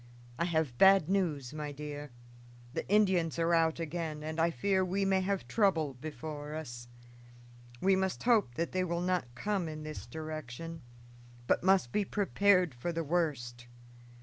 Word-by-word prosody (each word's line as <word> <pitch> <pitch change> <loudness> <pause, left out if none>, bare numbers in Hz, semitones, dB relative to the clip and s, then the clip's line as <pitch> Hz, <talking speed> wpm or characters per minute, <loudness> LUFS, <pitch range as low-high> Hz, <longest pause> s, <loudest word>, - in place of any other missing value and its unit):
"I 170 - +2
have 160 -7 -1
bad 190 -4 +6
news, 155 -9 0
my 150 -1 -4
dear. 145 0 -7 0.6
The - - -4
Indians 190 -6 +3
are 170 0 +2
out 165 -1 +3
again, 160 -2 -4
and 155 +1 -4
I 165 +1 +4
fear 190 +7 +1
we 195 +2 0
may 190 -1 +3
have 195 0 -2
trouble 165 -10 +2
before 150 +2 -6
us. 120 -6 -7 0.9
We 195 +1 +4
must 190 -1 -1
hope 220 - +3
that 170 +4 -2
they 185 0 0
will 170 -1 -1
not 180 -10 -1
come 195 0 -1
in 155 0 -7
this 155 0 -7
direction, 155 0 -6 0.6
but - - +2
must 190 -10 +3
be 210 - +1
prepared 195 -4 +2
for 120 +8 -3
the 165 0 -2
worst. 140 -8 -2
165 Hz, 160 wpm, -32 LUFS, 150-190 Hz, 0.9 s, bad